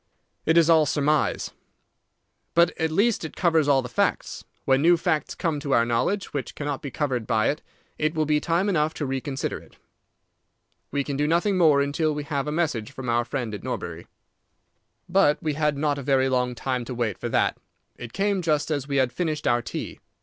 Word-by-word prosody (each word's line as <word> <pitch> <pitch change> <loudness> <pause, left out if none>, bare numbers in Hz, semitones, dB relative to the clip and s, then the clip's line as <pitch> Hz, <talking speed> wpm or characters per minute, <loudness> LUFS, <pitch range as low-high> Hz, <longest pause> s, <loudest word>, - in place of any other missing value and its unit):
"It 160 +1 +4
is 165 -2 +6
all 160 -3 +5
surmise." 150 +1 +1 1.0
"But 170 +1 +5
at 160 -1 +1
least 205 +7 +1
it 160 - -6
covers 165 -4 +2
all 135 -2 +4
the - - -5
facts. - - -1 0.2
When 135 0 +3
new 170 +2 +5
facts 155 -3 -1
come 160 -3 -1
to 140 -2 -2
our 115 - +4
knowledge 120 +13 -1
which 140 -3 -4
cannot 145 -2 -3
be 140 - -5
covered 130 -4 -2
by 110 -2 +2
it, 150 - -2 0.4
it 155 +1 0
will 155 -1 +1
be 150 0 +2
time 170 +5 0
enough 155 -5 +1
to 150 - -3
reconsider 135 0 -3
it. - - -19 1.1
We 140 0 -1
can 140 0 -4
do 145 +1 +1
nothing 175 +5 +2
more 155 -6 +5
until 150 +2 0
we 150 - -3
have 145 -2 -2
a - - -1
message 150 -9 -1
from 130 -2 -6
our 120 0 +2
friend 120 -3 -4
at 105 - -6
Norbury." - - -5 1.0
But 180 -5 +3
we 155 -1 0
had 150 -1 0
not 145 -1 0
a - - -4
very 135 -1 +2
long 125 -1 0
time 125 0 -2
to 125 - -6
wait 115 -5 -2
for - - -3
that. - - +1 0.4
It 120 -2 -9
came 200 +2 0
just 155 -2 0
as 140 -3 -2
we 140 - -2
had 130 -2 +2
finished 155 -2 -2
our 120 0 +3
tea. - - -6
145 Hz, 205 wpm, -25 LUFS, 130-160 Hz, 1.1 s, is